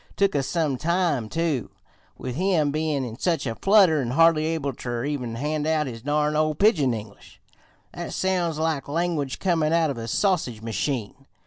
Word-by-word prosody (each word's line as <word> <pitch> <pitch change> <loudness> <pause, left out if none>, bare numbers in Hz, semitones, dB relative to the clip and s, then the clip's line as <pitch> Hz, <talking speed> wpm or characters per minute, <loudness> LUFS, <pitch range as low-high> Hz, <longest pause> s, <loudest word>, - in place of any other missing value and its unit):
Took 200 -1 +2
us 135 -2 0
some 155 -6 0
time, 165 -8 0
too, 160 -6 -1 0.5
with 125 - -5
him 165 -2 +1
bein' 150 -3 -1
in 115 0 -8
such 165 -4 0
a 115 - -2
flutter 190 - +4
an' 120 - -3
hardly 160 +3 +4
able 155 -4 -2
ter 120 +1 -4
even 125 -6 -3
hand 150 +4 -2
out 155 -1 +1
his 115 -4 -7
darn 150 +3 0
ol' 155 0 +1
pigeon 160 - +3
English, 105 -3 -8 0.5
that - - -6
sounds 180 -4 0
like 160 -3 -1
language 155 -3 -1
comin' 165 -4 +1
out 165 -3 +2
of 125 - -6
a 115 - -5
sausage 145 - 0
machine. 115 +3 -3
150 Hz, 180 wpm, -24 LUFS, 130-165 Hz, 0.5 s, flutter